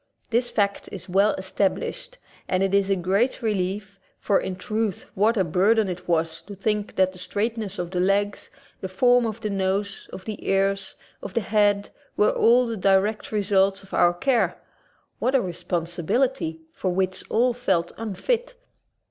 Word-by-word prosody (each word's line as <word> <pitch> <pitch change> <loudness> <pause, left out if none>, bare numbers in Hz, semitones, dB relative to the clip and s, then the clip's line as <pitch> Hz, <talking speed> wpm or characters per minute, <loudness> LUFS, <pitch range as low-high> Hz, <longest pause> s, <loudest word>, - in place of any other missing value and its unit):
This 240 +1 +2
fact 200 -3 -1
is 195 - -7
well 195 +3 +3
established, 190 - -2 0.3
and 185 +1 +2
it 195 0 0
is 200 -1 +3
a 195 - +3
great 195 +8 0
relief, 200 -1 -2 0.2
for 200 - +2
in 185 - -4
truth 215 +2 -2
what 220 +4 +2
a 190 - +3
burden 200 +6 +3
it 180 -1 -6
was 165 -1 0
to 205 - -10
think 210 +1 -2
that 185 0 +3
the 185 - -13
straightness 205 +2 -3
of 175 -1 -4
the 180 - -1
legs, 200 +2 0 0.3
the 190 - -5
form 245 +5 +3
of 220 +1 -5
the 215 -2 -2
nose, 195 +1 -2
of 190 - -9
the 215 -2 -6
ears, 195 0 +1 0.3
of - - -8
the 230 - +2
head, 205 -1 +2 0.3
were 210 - +4
all 245 +2 +4
the 230 -2 -3
direct 195 +3 +2
results 200 -1 +2
of 195 - -16
our 175 0 +4
care! 255 +5 +1 0.6
What 260 +2 +1
a 265 - +4
responsibility, 175 - -1
for 185 - -2
which 185 +1 -1
all 245 +2 +3
felt 190 -8 0
unfit! 460 - -2
200 Hz, 170 wpm, -24 LUFS, 185-220 Hz, 0.6 s, were